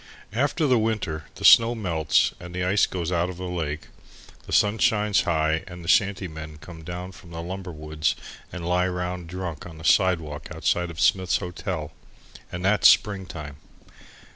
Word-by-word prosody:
After 140 +7 +1
the 130 -4 +4
winter, 105 -9 -2
the - - -5
snow 115 +1 +8
melts 85 -8 +1
and 90 0 -9
the 90 - -1
ice 95 +3 +3
goes 90 -2 -3
out 85 0 +1
of 90 - -7
the 90 - -7
lake, 80 -3 -3 0.7
the - - -8
sun 105 +1 +3
shines 105 -3 +3
high 80 -1 +1
and 90 -1 -9
the - - -9
shanty 100 0 +2
men 80 -1 -9
come 80 +2 -11
down 90 +3 -6
from 90 -1 -15
the 85 -1 -7
lumber 95 +1 -6
woods 75 0 -2 0.4
and 85 -2 -6
lie 90 +1 +2
round 90 -1 -4
drunk 90 -3 -6
on 80 -2 -11
the 80 - -11
sidewalk 80 -5 +2
outside 90 0 0
of 80 -2 -9
Smith's 95 -2 +3
Hotel 90 -4 -5 0.6
and 90 +1 -4
that's 105 +2 +6
spring 100 -3 +2
time. 75 -4 -8
90 Hz, 180 wpm, -25 LUFS, 80-95 Hz, 0.7 s, snow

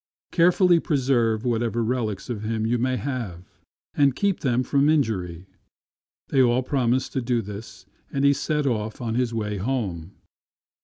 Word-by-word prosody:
Carefully 175 0 +4
preserve 125 -7 +1
whatever 120 -1 0
relics 110 -4 -2
of 120 -5 -4
him 110 0 -2
you 120 +1 +1
may 130 +1 0
have, 115 -11 -6 0.3
and 140 -3 +3
keep 200 -2 0
them 125 -2 +1
from 140 +2 +2
injury." 95 - 0 0.8
They 135 - +3
all 125 0 +3
promised 130 -1 0
to 130 - -1
do 120 0 0
this, 105 +2 -9 0.3
and 140 0 0
he 140 - +6
then - - +3
set 150 +1 -1
off 110 -4 -2
on 115 -3 -3
his 125 0 0
way 105 -2 -3
home. 95 -6 -3
120 Hz, 160 wpm, -24 LUFS, 110-135 Hz, 0.8 s, he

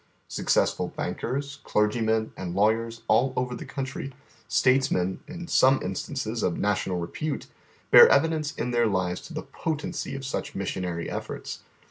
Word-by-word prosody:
Successful - - +1
bankers, 140 +3 -4
clergymen, 110 +1 +1
and 90 -2 -5
lawyers 115 +3 +1
all 130 +2 +3
over 125 0 -1
the 120 - -7
country, 135 0 -4 0.4
statesmen 110 -8 +2
in 170 +2 -7
some 135 -3 +5
instances 110 +4 -3
of 85 - 0
na 105 0 +2
tional 95 -2 -2
repute, 140 - -3 0.5
bear 475 -1 +10
evidence 160 - +2
in 125 - -2
their 120 -1 +3
lives 95 -3 -1
to - - -12
the - - -4
potency 155 -3 -4
of 135 0 -6
such 135 - -4
missionary 90 -3 -3
efforts. - - -5
120 Hz, 145 wpm, -26 LUFS, 100-135 Hz, 0.5 s, bear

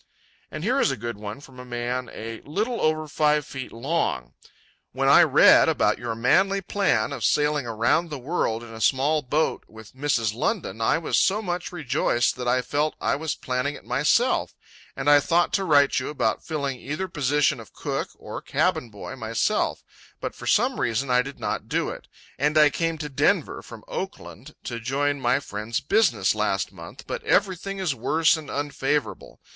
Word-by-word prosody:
And 155 - -6
here 250 +7 +1
is - - +3
a 135 - -2
good 115 0 -5
one 105 +4 -7
from 130 -3 -14
a - - -7
man 125 0 -3
a 115 +1 -7
"little 215 - -2
over 155 0 +1
five 150 0 +2
feet 130 -2 -7
long": 115 - -2 0.6
"When - - 0
I - - +8
read - - +6
about - - +1
your 120 -2 -3
manly 190 - +3
plan 185 - 0
of 130 -5 -6
sailing 150 -1 +2
around 115 +9 +1
the 150 - -5
world 125 -5 -2
in 115 -1 -11
a 110 - -8
small 145 +6 +2
boat 150 +4 0
with 110 -1 -14
Mrs. 130 -6 0
London, 130 - -2
I 115 - +3
was 165 - +1
so 195 +3 +2
much 175 -2 -3
rejoiced 140 -7 0
that 125 -1 -4
I 125 +1 +2
felt 150 +3 -1
I - - +1
was 155 +1 -3
planning 130 +3 -2
it - - -13
myself, 150 - +1 0.4
and - - -4
I 145 0 +7
thought 170 +4 +1
to 195 - +1
write 145 -6 +4
you 130 - -4
about 150 - -1
filling 140 -5 -3
either 155 +10 -4
position 145 -3 +1
of - - -12
cook - - -3
or - - -7
cabin 120 - 0
boy 105 +5 -8
myself, 115 -2 -1 0.4
but - - -4
for - - -9
some - - +2
reason 125 +3 0
I 125 0 +5
did 140 +2 -8
not - - -3
do - - 0
it, - - -10 0.3
and 150 +3 +2
I 150 -1 +6
came 165 +1 -1
to 150 -1 -5
Denver 135 - +1
from - - -12
Oakland - - -7
to 115 - -5
join 140 +4 -1
my 125 +2 +2
friend's 110 0 -4
business 205 +11 +2
last - - -1
month, - - -11
but 485 -1 -5
everything 195 - 0
is 185 -6 0
worse 155 +7 +2
and 155 -3 -8
unfavourable. 145 0 -2
145 Hz, 185 wpm, -24 LUFS, 120-160 Hz, 0.6 s, I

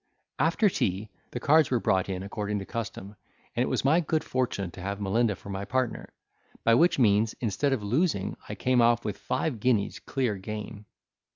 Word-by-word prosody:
After 165 - +3
tea, 105 - -1 0.2
the 120 - -5
cards 155 +4 +4
were 125 - +2
brought 95 -3 +1
in 95 -1 -3
according 105 +1 -3
to 100 - -5
custom, 105 -2 -6 0.4
and - - +1
it - - +2
was - - -1
my 155 +5 +5
good 160 -1 0
fortune 110 -8 -2
to 90 - -10
have 100 +2 -3
Melinda 105 +2 +1
for 100 - -12
my 100 0 -3
partner; 130 +3 -2 0.5
by 115 - +5
which 170 +10 +4
means, 110 -3 +3
instead 120 +5 0
of 130 -6 0
losing, 120 - 0
I - - -4
came 125 -1 +2
off 120 -1 +3
with 105 -2 -2
five 130 -8 -2
guineas 110 -3 +1
clear 125 -7 -1
gain. 105 +1 -7
110 Hz, 190 wpm, -28 LUFS, 100-130 Hz, 0.5 s, my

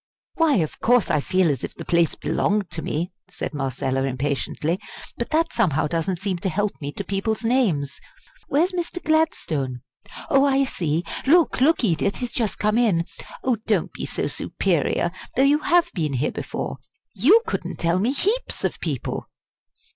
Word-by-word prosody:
"Why, 325 -4 +3
of 160 -7 -1
course 245 0 +3
I 150 - +3
feel 185 0 +2
as 135 - -3
if - - -5
the - - -8
place 170 -2 +2
belonged 205 -2 0
to 165 - -3
me!" 170 +5 -2 0.2
said - - -5
Marcella, 135 -1 -1
impatiently; 140 +5 -1 0.4
"but 235 - -4
that 325 +1 +1
somehow 180 - +2
doesn't 165 +3 -1
seem 190 -1 -2
to 190 - -1
help 205 +4 0
me 140 0 -3
to 200 - -4
people's 200 +4 -2
names. 215 - +1 0.5
Where's 330 +7 +2
Mr. 355 0 -3
Gladstone? 160 - 0 0.5
Oh, 275 0 +4
I 275 -1 +3
see. 170 - -1 0.2
Look, 330 -3 +4
look, 305 +1 +4
Edith! 185 -1 +1
he's 245 -2 -4
just 225 -5 -1
come 215 +2 +2
in! 185 -9 +2 0.4
oh, 255 -3 +2
don't 205 -7 +1
be - - -5
so - - -2
superior, - - 0 0.2
though 265 - +4
you 285 +2 +4
have 345 +2 +3
been 155 -6 -1
here 130 +3 0
before - - -4 0.4
you 320 - +5
couldn't - - -3
tell 170 +2 +1
me 225 +7 +2
heaps 415 - -1
of - - -1
people!" - - -3
200 Hz, 170 wpm, -23 LUFS, -, 0.5 s, you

